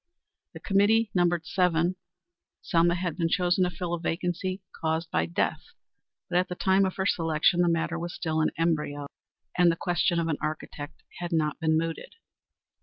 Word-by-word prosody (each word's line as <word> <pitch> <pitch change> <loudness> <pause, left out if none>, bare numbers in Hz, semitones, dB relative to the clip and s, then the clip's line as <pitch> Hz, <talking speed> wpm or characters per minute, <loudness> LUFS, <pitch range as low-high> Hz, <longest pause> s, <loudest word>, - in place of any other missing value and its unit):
The - - -9
committee 205 +2 +3
numbered 175 -2 +2
seven. 180 -1 +1 0.7
Selma 170 +1 +3
had 175 -2 -3
been 165 -2 +1
chosen 180 +1 +2
to - - 0
fill 180 -1 -4
a 175 - -1
vacancy 180 +3 -2 0.2
caused 160 +1 -1
by 80 0 +1
death, 85 - -1 0.7
but 175 0 +2
at 185 - 0
the 180 - -4
time 190 +2 +3
of 190 - -2
her 190 - -1
selection 165 -1 +2
the 175 - +3
matter 165 0 0
was 175 +1 -5
still 160 -1 -1
in 155 - +3
embryo, 150 -3 0 0.5
and 175 -1 +6
the - - -1
question 175 0 +1
of 165 - 0
an 155 -3 -1
architect 155 0 -5 0.2
had 175 0 -4
not 155 -2 0
been 160 -1 +2
mooted. 165 - -4
170 Hz, 180 wpm, -27 LUFS, 160-180 Hz, 0.7 s, and